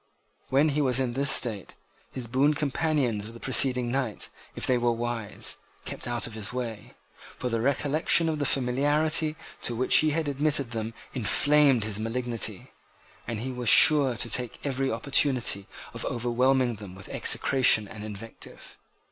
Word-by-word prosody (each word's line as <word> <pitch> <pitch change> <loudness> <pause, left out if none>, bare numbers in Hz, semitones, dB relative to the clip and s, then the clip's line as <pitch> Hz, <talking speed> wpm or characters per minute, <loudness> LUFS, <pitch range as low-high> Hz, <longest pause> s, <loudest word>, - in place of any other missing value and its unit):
When 140 +4 +3
he 150 +1 0
was 130 -2 +1
in 125 -2 -1
this 140 +2 0
state, 110 -8 +1 0.4
his 130 -2 -5
boon 135 +6 +1
companions 140 -7 -1
of 115 - -11
the - - -11
preceding 125 -1 +1
night, 130 -5 -2 0.3
if - - -1
they 130 - +2
were 120 0 +1
wise, 115 -3 -3 0.3
kept - - -4
out 120 -2 -1
of 115 - -6
his 110 0 -4
way: 120 -4 -6 0.4
for 125 - -3
the 115 -1 -1
recollection 145 +5 +3
of 155 -2 -2
the 145 - 0
familiarity 145 +5 +1 0.3
to 120 - -1
which 130 +3 +4
he 155 - +3
had 155 0 -1
admitted 140 -2 0
them 115 0 -5 0.2
inflamed 140 +1 +3
his 105 -1 -3
malignity; 115 0 -3 0.6
and 115 -2 -4
he 130 +2 -4
was 125 -2 -1
sure 145 -5 +7
to 120 - 0
take 120 +1 0
every 135 -1 -1
opportunity 125 -4 0 0.3
of - - -6
overwhelming 125 0 0
them 100 -3 -10
with 95 0 -12
execration 125 -5 +3
and 105 +1 -9
invective. 110 +1 -9
125 Hz, 165 wpm, -26 LUFS, 115-140 Hz, 0.6 s, sure